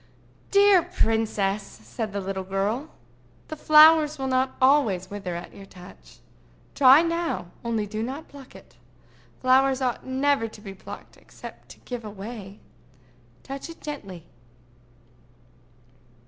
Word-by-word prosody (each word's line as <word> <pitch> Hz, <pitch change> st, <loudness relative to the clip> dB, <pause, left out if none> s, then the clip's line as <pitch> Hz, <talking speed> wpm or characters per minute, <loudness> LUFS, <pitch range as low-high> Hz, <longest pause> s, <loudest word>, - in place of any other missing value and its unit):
"Dear 400 Hz, -2 st, +6 dB
princess!" 220 Hz, -, 0 dB
said 195 Hz, -, -7 dB
the 200 Hz, 0 st, -3 dB
little 190 Hz, 0 st, -4 dB
girl, 200 Hz, +10 st, -2 dB, 0.6 s
"the 310 Hz, -, -5 dB
flowers 310 Hz, 0 st, +6 dB
will 270 Hz, -, -4 dB
not 260 Hz, 0 st, 0 dB
always 240 Hz, -10 st, +2 dB
wither 195 Hz, -4 st, -5 dB
at 170 Hz, -, -8 dB
your 195 Hz, -, -12 dB
touch. 180 Hz, -1 st, -15 dB, 0.6 s
Try 275 Hz, +3 st, +7 dB
now—only 235 Hz, -, -3 dB
do 215 Hz, +1 st, -5 dB
not 270 Hz, +7 st, -5 dB
pluck 275 Hz, -2 st, -14 dB
it. -, -, -16 dB, 0.6 s
Flowers 260 Hz, +1 st, +3 dB
ought 255 Hz, -3 st, -2 dB
never 265 Hz, -2 st, 0 dB
to 220 Hz, -, -13 dB
be 200 Hz, -2 st, -9 dB
plucked 190 Hz, -, -11 dB
except -, -, -13 dB
to -, -, -14 dB
give 245 Hz, -2 st, -7 dB
away. 205 Hz, -1 st, -9 dB, 0.8 s
Touch 275 Hz, +4 st, -7 dB
it 330 Hz, -, -11 dB
gently." 195 Hz, -, -8 dB
240 Hz, 125 wpm, -25 LUFS, 195-285 Hz, 0.8 s, Try